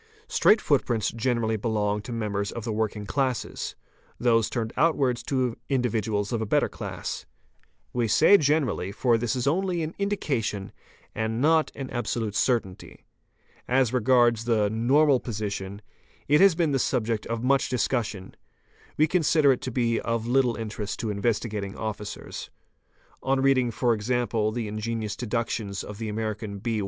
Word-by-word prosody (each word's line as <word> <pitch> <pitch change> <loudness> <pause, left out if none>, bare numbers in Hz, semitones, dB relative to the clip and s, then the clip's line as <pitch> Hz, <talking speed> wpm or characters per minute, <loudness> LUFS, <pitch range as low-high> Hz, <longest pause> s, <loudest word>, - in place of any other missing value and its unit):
Straight 215 - +4
footprints 120 -6 +1
generally 115 -1 0
belong 105 -1 0
to 120 - -8
members 105 -3 -2
of 115 - -6
the 115 -1 -2
working 105 -1 -2
classes, 130 +4 -2 0.4
those 115 -2 +3
turned 115 -2 -3
outwards 135 -5 +2
to 130 -4 0
individuals 110 -5 0
of 115 - 0
a - - -1
better - - +2
class. - - -6 0.7
We 120 -2 +1
say 200 - +6
"generally'', 145 - 0
for 120 +2 +2
this 120 +2 -1
is 125 -1 -1
only 175 +3 +1
an 155 +2 -4
"indication" 135 - -2 0.4
and 110 +1 -2
not 160 +3 +3
an 135 -2 -6
absolute 115 -3 -2
certainty. 105 -5 -1 0.6
As 130 -1 +2
regards 120 -2 +3
the 110 -3 +2
"normal 135 +5 +4
position', 100 -3 -5 0.4
it 150 +4 +4
has 195 -4 +6
been 165 -3 +1
the 135 - +1
subject 115 -4 -1
of 115 0 -3
much 135 +1 +2
discussion; 115 -6 -2 0.6
we 155 - +5
consider 155 -3 +3
it 130 - 0
to 130 - -4
be 115 -1 +1
of 115 -1 -2
little 125 -1 +2
interest 110 -2 -5
to 110 - -2
Investigating 105 -1 -2
Officers. 105 -2 -6 0.7
On 135 +1 +1
reading, 135 -2 +3
for 120 +1 +1
example, 115 -1 0
the 115 -1 -3
ingenious 110 0 -3
deductions 115 -4 -3
of 105 0 -9
the 110 -1 -3
American 105 -1 -4
R. 120 - 0
115 Hz, 150 wpm, -26 LUFS, 110-130 Hz, 0.7 s, say